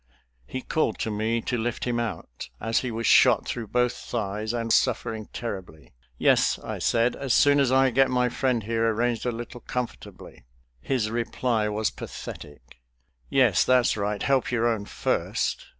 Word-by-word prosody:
He 130 - -5
called 155 -9 0
to 110 - -1
me 110 +2 -1
to 125 +1 -2
lift 120 +1 -2
him 120 -1 0
out, 110 - -5
as 115 +1 +1
he 125 - -3
was 115 0 -3
shot - - +5
through 115 -3 -4
both 125 +2 +1
thighs, 105 -1 -4
and 115 -1 -1
suffering 115 -3 0
terribly. 95 - -7 0.2
"Yes," - - +3
I - - -6
said, 115 +1 +2
"as 135 -3 0
soon 145 0 +5
as 135 -3 +3
I 130 0 +4
get 135 +3 +3
my 125 -1 +2
friend 125 -2 0
here 115 +1 +1
arranged 120 +2 0
a - - +1
little 120 +1 -7
comfortably." 125 - -6 0.4
His 110 - -1
reply 115 -1 -1
was 105 +1 -1
pathetic. 65 -4 -10 0.5
"Yes, - - +4
that's 125 -1 +3
right; 105 -1 -2
help 135 -2 +2
your 120 -1 +1
own 110 -3 -1
first." - - -2
115 Hz, 165 wpm, -26 LUFS, 110-125 Hz, 0.5 s, shot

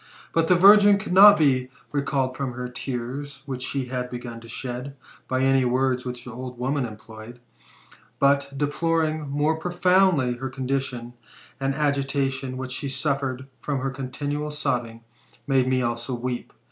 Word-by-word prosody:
But 165 -1 +2
the 180 - +5
virgin 205 +2 +7
could 195 -2 -4
not 205 +2 +9
be 130 -4 +2 0.2
recalled 140 -2 -1
from 130 -3 -4
the 125 0 -4
tears 135 +3 -5
which 130 -2 -5
she 135 +1 -2
had 125 0 -4
begun 120 -1 -7
to 115 - -13
shed, 125 +3 -5 0.3
by 130 0 0
any 135 0 +4
words 125 0 +1
which 125 -1 -6
the 125 - -7
old 125 +1 -7
woman 130 +1 -1
employed; 110 +2 -11 0.8
but, 140 0 +2
deploring 155 +1 0
more 150 +3 +1
profoundly 175 -7 +2
her 130 +1 -4
condition, 130 -2 -3 0.5
the 135 - -3
agitation 135 -2 -1
which 130 0 -5
she 140 +2 -3
suffered 135 -2 -1
from 145 -2 -2
her 135 0 -2
continual 145 +3 -4
sobbing 120 -6 -2 0.4
made 135 -2 +2
me 130 -1 +1
also 120 +1 -2
weep. 120 0 -4
135 Hz, 155 wpm, -24 LUFS, 125-145 Hz, 0.8 s, not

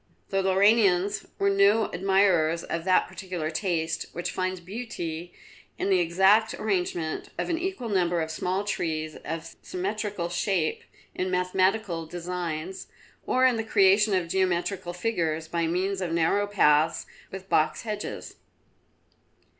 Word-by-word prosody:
The 195 0 +1
Lauranians 195 0 +3
were 200 0 +2
no 200 +3 +4
admirers 180 -4 +2
of 165 0 -4
that 185 -1 +3
peculiar 180 -5 -5
taste 165 -2 -1
which 175 - -3
finds 185 0 -2
beauty 175 -4 -6 0.5
in 195 - -1
the 185 - +4
exact 190 +6 +3
arrangement 180 -6 -2
of - - -2
an 325 - 0
equal 375 -8 -3
number 175 -4 +1
of 160 -1 -2
small 185 +4 -1
trees 155 -6 -2
of 165 0 -6
symmetrical 200 -1 -3
shape 175 -2 -1 0.3
in 185 - -2
mathematical 185 -1 0
designs, 175 0 -5 0.4
or 255 0 +3
in 250 -3 +4
the 225 - -1
creation 205 -1 +4
of 180 -2 0
geometrical 180 0 -1
figures 165 -5 -1
by 170 0 -1
means 190 +3 -1
of 175 -3 -2
narrow 170 +5 +2
paths 160 -5 +3 0.2
with 190 0 -8
box 155 -4 +1
hedges. 210 -2 -5
185 Hz, 135 wpm, -26 LUFS, 170-200 Hz, 0.5 s, no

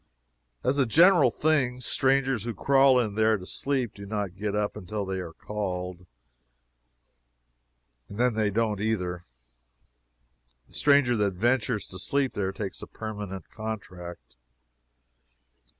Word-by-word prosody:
As 140 +3 +1
a 135 - +3
general 170 - +6
thing, 130 -3 +1
strangers 135 -2 +1
who 120 -2 -3
crawl 135 +2 +5
in 110 -4 -1
there 110 +1 +3
to 90 - -10
sleep 130 +1 -1
do 100 0 -10
not 100 -3 -3
get 105 +1 -3
up 105 0 -1
until 100 +3 -4
they 95 0 -3
are 85 -3 -6
called. 90 -2 -5 2.0
And 100 - -9
then 125 0 +2
they 110 -1 +1
don't 105 -1 0
either. 90 -5 -1 1.5
The - - -22
stranger 140 -4 +4
that 100 -3 0
ventures 115 0 +1
to 95 - -7
sleep 140 +5 0
there 95 -2 -1
takes 95 -1 -5
a - - -8
permanent 105 -3 -7
contract. 90 - -7
110 Hz, 135 wpm, -27 LUFS, 95-125 Hz, 2.0 s, general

